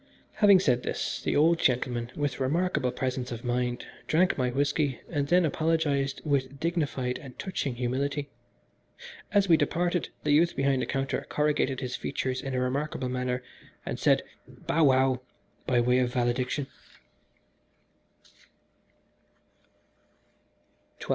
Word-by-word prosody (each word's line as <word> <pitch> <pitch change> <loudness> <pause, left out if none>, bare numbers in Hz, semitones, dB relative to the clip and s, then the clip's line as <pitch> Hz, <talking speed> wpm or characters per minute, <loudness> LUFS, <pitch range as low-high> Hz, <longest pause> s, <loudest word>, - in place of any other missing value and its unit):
Having 200 -3 +6
said 125 -7 +2
this, - - -3
the - - -1
old 165 +3 +4
gentleman, 120 -1 0
with 145 -2 -2
remarkable 145 -1 0
presence 125 0 -3
of 115 -1 -6
mind, 125 0 -1 0.2
drank 175 +3 +3
my 125 -2 0
whisky, 145 0 0
and 145 -1 0
then 175 +2 +4
apologised 150 -3 0
with 140 -2 -1
dignified 145 -7 -1
and 130 -3 -12
touching 150 -9 -3
humility. 140 +4 -2 1.0
As 200 -1 +3
we 165 -3 +6
departed 175 +1 0
the 150 - +1
youth 165 +4 +4
behind 135 -1 +1
the - - -2
counter 135 -1 -2
corrugated 150 -3 0
his 130 -1 -3
features 130 -1 -3
in 135 -2 -4
a - - +1
remarkable 130 +1 -2
manner, 125 0 -2 0.4
and - - -4
said, - - +3 0.2
"bow 160 -1 0
wow" 130 -1 +3 0.5
by 125 -2 +3
way 125 +1 +3
of 125 -1 +1
valediction. 125 +2 0
135 Hz, 130 wpm, -28 LUFS, 125-150 Hz, 1.0 s, Having